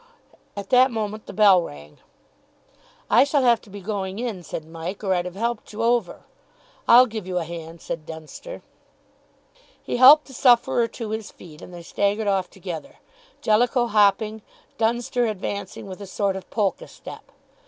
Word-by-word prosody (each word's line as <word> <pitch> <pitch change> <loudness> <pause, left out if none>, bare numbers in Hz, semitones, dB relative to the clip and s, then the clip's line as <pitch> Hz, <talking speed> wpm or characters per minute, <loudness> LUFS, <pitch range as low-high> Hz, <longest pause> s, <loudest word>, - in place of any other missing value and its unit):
At 200 - -7
that 255 +1 +6
moment 215 -2 -4
the - - -7
bell 200 -4 +5
rang. 75 - -11 1.1
"I - - +5
shall 285 -1 +1
have 240 -2 +4
to - - -18
be 200 +1 -9
going 195 -1 -4
in," 225 -6 -4
said 160 -1 -7
Mike, 165 +5 -7
"or 190 -2 +1
I'd 175 -1 -1
have 180 0 -7
helped 235 +1 -3
you 220 +2 -4
over." 235 -5 0 0.6
"I'll 245 +2 +8
give 220 -5 -7
you 180 -1 -2
a 175 - 0
hand," 165 0 -9
said 155 -1 -6
Dunster. 160 - -9 1.2
He - - -3
helped 280 +5 +8
the 265 - -14
sufferer 240 -2 +3
to 230 -2 -7
his 220 -1 -4
feet 155 -4 -14
and - - -11
they 175 -1 -10
staggered 205 +5 -1
off 195 -2 0
together, 180 -4 -8 0.5
Jellicoe 240 +3 +2
hopping, 215 0 +2 0.4
Dunster 240 +1 0
advancing 200 -2 -5
with 190 0 -9
a 200 - -8
sort 195 0 -1
of 190 - -8
polka 205 -4 -1
step. - - -12
205 Hz, 170 wpm, -23 LUFS, 180-235 Hz, 1.2 s, I'll